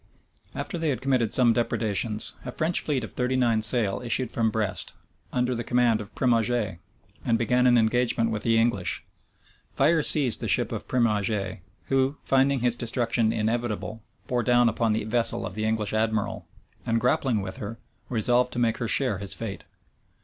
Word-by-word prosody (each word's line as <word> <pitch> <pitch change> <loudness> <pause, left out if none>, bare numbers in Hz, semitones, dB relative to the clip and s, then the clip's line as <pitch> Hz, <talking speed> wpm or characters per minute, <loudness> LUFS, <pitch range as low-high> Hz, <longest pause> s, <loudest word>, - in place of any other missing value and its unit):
After 175 - -4
they 160 -1 0
had 135 - -1
committed 130 -4 0
some 120 -3 +4
depredations, 110 -2 0
a 125 - -6
French 160 +6 +1
fleet 140 -5 -2
of 110 - -7
thirty 125 +1 -1
nine 120 -4 +2
sail 105 -3 +2
issued 120 0 0
from 115 -1 +1
Brest, 110 -2 -3 0.4
under 125 0 0
the 120 -1 -3
command 120 -2 +2
of 105 - -11
Primauget, 115 -6 0 0.4
and 115 -1 +1
began 125 +2 +2
an 120 -1 +5
engagement 115 0 +1
with 110 -1 -3
the 115 -1 +2
English. 115 -5 0 0.7
Fire 155 +4 +3
seized 140 -7 +4
the - - -3
ship - - +2
of - - -5
Primauget; 105 -5 0 0.3
who, 135 +1 0
finding 135 -1 +2
his 120 -1 +1
destruction 115 -1 0
inevitable, 110 0 -2 0.2
bore 125 -1 -1
down 120 +1 +3
upon 115 0 0
the 110 - -1
vessel 115 +1 -1
of - - -6
the 110 +2 -2
English 110 -2 -1
admiral, 110 -3 -1 0.4
and 115 0 0
grappling 125 -3 +1
with 95 0 -7
her, 110 +2 -6 0.3
resolved 125 +2 +2
to - - -5
make 115 -2 +1
her 120 - -2
share 110 -3 +1
his 100 -1 -1
fate. 110 -4 -6
115 Hz, 175 wpm, -26 LUFS, 110-125 Hz, 0.7 s, an